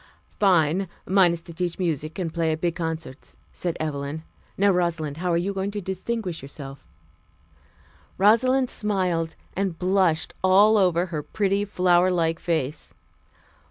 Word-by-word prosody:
"Fine! 185 -1 +3 0.2
Mine 190 -2 +4
is 170 -1 -5
to 170 - -11
teach 175 0 -3
music 160 -4 -2
and 170 -4 -3
play 165 -1 0
at 155 - -2
big 175 -1 +1
concerts," 160 -5 -6 0.2
said 175 -2 -3
Evelyn. 150 0 -4 0.3
"Now, 200 +1 +4
Rosalind, 165 -5 -1
how 180 +1 -1
are 170 - +2
you 190 +4 -1
going 195 0 -2
to 205 0 -4
distinguish 190 -1 -4
yourself?" 135 0 -9 1.3
Rosalind 250 +6 +3
smiled 180 -6 -1 0.2
and 190 -3 -1
blushed 185 -3 +1
all 205 +3 +6
over 180 -2 +2
her 150 - -1
pretty 200 +5 0
flower 180 -2 +3
like 165 -2 0
face. 160 -4 -3
175 Hz, 145 wpm, -24 LUFS, 160-195 Hz, 1.3 s, all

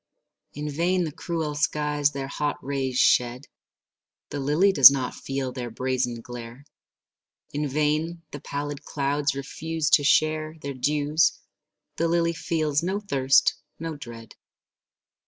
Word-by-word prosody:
In 150 +1 -4
vain 175 +5 0
the 160 - -3
cruel 160 -1 -3
skies 150 0 +1
their 140 -2 -5
hot 145 +1 -2
rays 135 -2 -2
shed; 125 +3 +3 0.9
The 145 - -3
lily 150 +8 +3
does 140 -8 +10
not 135 -2 -2
feel 135 -1 -4
their 125 -1 -5
brazen 125 0 -2
glare. 120 +3 -9 0.9
In 145 +1 -2
vain 155 +4 -1
the 145 - -7
pallid 145 0 -5
clouds 145 0 -1
refuse 155 +3 -3
to 145 - +6
share 155 +2 +2
Their 140 0 -4
dews; 150 +4 +1 0.6
the 165 - +1
lily 170 0 +1
feels 155 -4 -1
no 190 +4 -1
thirst, 135 -10 +3 0.2
no 165 -1 -5
dread. 115 -5 -10
145 Hz, 135 wpm, -25 LUFS, 135-155 Hz, 0.9 s, does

